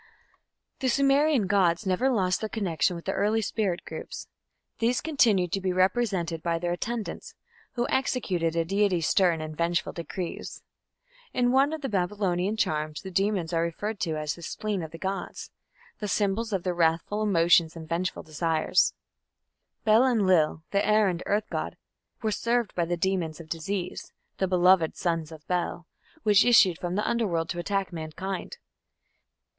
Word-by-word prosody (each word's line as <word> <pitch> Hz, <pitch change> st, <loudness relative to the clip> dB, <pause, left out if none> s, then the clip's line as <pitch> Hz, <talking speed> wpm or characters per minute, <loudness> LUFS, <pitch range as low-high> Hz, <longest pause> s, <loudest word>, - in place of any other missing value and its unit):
The 260 Hz, -, -1 dB
Sumerian 275 Hz, -1 st, +3 dB
gods 190 Hz, -1 st, +2 dB
never 190 Hz, +8 st, +2 dB
lost 185 Hz, -7 st, +1 dB
their 220 Hz, -, -3 dB
connection 180 Hz, -6 st, 0 dB
with 170 Hz, -, -9 dB
the 195 Hz, -, 0 dB
early 215 Hz, +3 st, +1 dB
spirit 195 Hz, -5 st, -1 dB
groups. -, -, -7 dB, 0.5 s
These 235 Hz, +2 st, +2 dB
continued 225 Hz, -, +2 dB
to 195 Hz, -, -1 dB
be 185 Hz, -1 st, 0 dB
represented 185 Hz, -3 st, +1 dB
by 170 Hz, 0 st, 0 dB
their 175 Hz, +1 st, -2 dB
attendants, 225 Hz, +5 st, -4 dB, 0.4 s
who 240 Hz, -1 st, -1 dB
executed 185 Hz, -11 st, 0 dB
a 165 Hz, -1 st, +1 dB
deity's 190 Hz, -3 st, +1 dB
stern 175 Hz, -4 st, +3 dB
and 155 Hz, 0 st, -6 dB
vengeful 170 Hz, 0 st, 0 dB
decrees. 170 Hz, +1 st, -6 dB, 0.7 s
In 245 Hz, -1 st, +2 dB
one 270 Hz, +3 st, +4 dB
of 315 Hz, -1 st, -4 dB
the 270 Hz, -, -2 dB
Babylonian 195 Hz, -1 st, 0 dB
charms 155 Hz, -3 st, -1 dB
the 190 Hz, -, -7 dB
demons 190 Hz, -2 st, 0 dB
are 165 Hz, -, +2 dB
referred 200 Hz, +6 st, -3 dB
to 160 Hz, -4 st, -1 dB
as 150 Hz, -1 st, -2 dB
"the 170 Hz, -, -12 dB
spleen 205 Hz, +3 st, -3 dB
of 160 Hz, -, -6 dB
the 165 Hz, -, -10 dB
gods" 195 Hz, +3 st, -5 dB, 0.5 s
the 210 Hz, -, -3 dB
symbols 210 Hz, +3 st, 0 dB
of 190 Hz, -4 st, -1 dB
their 180 Hz, -, -1 dB
wrathful 170 Hz, +5 st, +1 dB
emotions 170 Hz, -4 st, +4 dB
and 160 Hz, -1 st, -8 dB
vengeful 175 Hz, +3 st, -2 dB
desires. 160 Hz, +2 st, +1 dB, 0.9 s
Bel 220 Hz, +3 st, +5 dB
Enlil, 185 Hz, -10 st, +2 dB
the 200 Hz, 0 st, +2 dB
air 210 Hz, -1 st, +4 dB
and 175 Hz, -1 st, -3 dB
earth 210 Hz, +1 st, 0 dB
god, -, -, -3 dB, 0.5 s
was 215 Hz, -2 st, +1 dB
served 235 Hz, -2 st, 0 dB
by 170 Hz, -, 0 dB
the 175 Hz, +1 st, -2 dB
demons 175 Hz, -3 st, -1 dB
of 160 Hz, -1 st, -11 dB
disease, 175 Hz, +3 st, -4 dB, 0.3 s
"the 190 Hz, -, +1 dB
beloved 180 Hz, -2 st, +4 dB
sons 165 Hz, -3 st, -1 dB
of 155 Hz, -1 st, -12 dB
Bel", 175 Hz, -1 st, -2 dB, 0.4 s
which 210 Hz, -1 st, +5 dB
issued 205 Hz, -8 st, +5 dB
from 175 Hz, 0 st, -3 dB
the 210 Hz, -, 0 dB
Underworld 180 Hz, -8 st, 0 dB
to 175 Hz, -, -3 dB
attack 195 Hz, +1 st, -2 dB
mankind. 180 Hz, -, -5 dB
185 Hz, 165 wpm, -27 LUFS, 170-210 Hz, 0.9 s, Bel